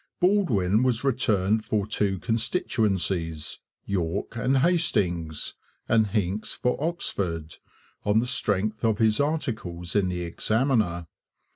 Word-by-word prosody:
Baldwin 125 - +3
was 125 -2 +1
returned 110 -5 +2
for 105 -2 0
two 105 -2 0
constituencies, 95 - -1 0.3
York 95 +2 -2
and 130 +3 +1
Hastings, 90 - +1 0.3
and 110 -2 +3
Hincks 100 0 -1
for 125 - 0
Oxford, 90 - -2 0.5
on 105 +2 +3
the 120 - 0
strength 110 -2 0
of 110 -2 +2
his 110 -1 +3
articles 110 - -2
in 100 -3 +3
the 90 -1 -3
Examiner. 110 0 0
105 Hz, 115 wpm, -26 LUFS, 90-120 Hz, 0.5 s, Baldwin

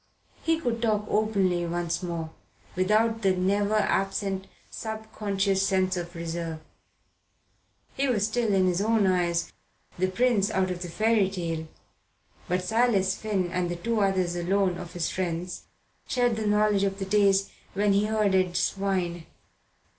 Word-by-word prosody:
He 325 0 +1
could 235 -7 -2
talk 215 -3 +1
openly 195 -5 +1
once 170 +1 -2
more, 170 -3 -4 0.4
without 215 +5 +2
the 190 -2 +3
never 200 +3 +1
absent 195 -2 0 0.2
subconscious 205 -3 -2
sense 185 -1 +1
of 175 0 -5
reserve. 165 -1 -4 1.4
He 275 - +1
was 215 -6 +2
still, 225 0 0
in 190 -1 +3
his 180 +1 +1
own, 220 -1 +3
eyes, 175 -2 +1 0.5
the 185 - +2
prince 205 +1 +2
out 190 -1 0
of 180 -1 -5
the 175 - -5
fairy 215 +1 +2
tale; 165 -4 -4 0.8
but 180 +1 0
Silas 200 -2 +2
Finn 195 -5 -2
and 180 0 -1
the 175 - -2
two 225 +6 -1
others 185 -3 +1
alone 180 +1 +1
of 175 0 -8
his 175 -3 -2
friends 180 -1 -3 0.4
shared 245 -2 +1
the 215 -1 -2
knowledge 210 -1 +3
of 195 -1 0
the 195 - -3
days 195 0 +3 0.2
when 205 0 +3
he 200 +1 +3
herded 190 -4 +2
swine. 185 -4 -1
195 Hz, 145 wpm, -27 LUFS, 180-215 Hz, 1.4 s, the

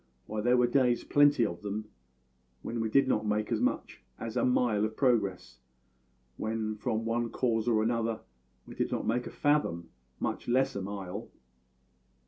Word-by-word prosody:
Why, 110 0 -3
there 120 +3 +3
were 125 - +5
days 120 -1 +2
plenty 145 -4 +4
of 85 0 -4
them 105 +1 -4 0.8
when 115 +1 -3
we 110 - -1
did 135 +3 +4
not 110 -4 +1
make 105 0 0
so - - +1
much - - -1 0.2
as 115 -1 -6
a - - +1
mile 120 -4 +2
of 110 0 -2
progress; 100 - 0 0.8
when, 110 0 -2
from 110 +1 -2
one 115 +1 0
cause 115 -1 0
or 110 -2 +3
another, 115 -1 0 0.4
we - - -10
did - - -2
not - - -2
make 120 +2 0
a - - -5
fathom, 145 - 0 0.3
much - - -3
less 130 +2 +2
a 100 - -2
mile. 100 +1 -6
115 Hz, 170 wpm, -30 LUFS, 105-120 Hz, 0.8 s, were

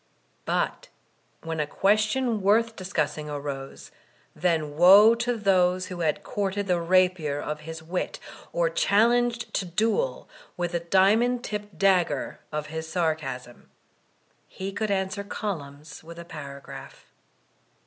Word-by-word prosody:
But - - -1 0.6
when 165 -1 -4
a 150 - 0
question 215 - +1
worth 225 +4 +3
discussing 155 -5 -2
arose, 140 -2 -6 0.4
then 160 -4 0
woe 195 +7 +8
to 235 +1 -1
those 185 -3 +2
who 180 -1 -7
had 155 -3 0
courted 200 0 -2
the 180 -2 +1
rapier 175 -4 +2
of 150 +1 -4
his 160 +1 -8
wit, 175 +3 -3 0.3
or - - +1
challenged 240 - +2
to - - 0
duel 220 - -1 0.3
with 175 -1 -2
the 170 - 0
diamond 210 +8 +3
tipped 210 -4 -6
dagger 180 -6 +1
of 150 0 -3
his 160 +1 -6
sarcasm. 150 -8 -3 0.8
He 190 +1 -6
could 215 +2 -2
answer 195 +1 -1
columns 155 -9 -6
with 170 +1 -11
a 170 - -8
para 140 -4 -8
graph. 135 0 -11
180 Hz, 130 wpm, -26 LUFS, 155-210 Hz, 0.8 s, woe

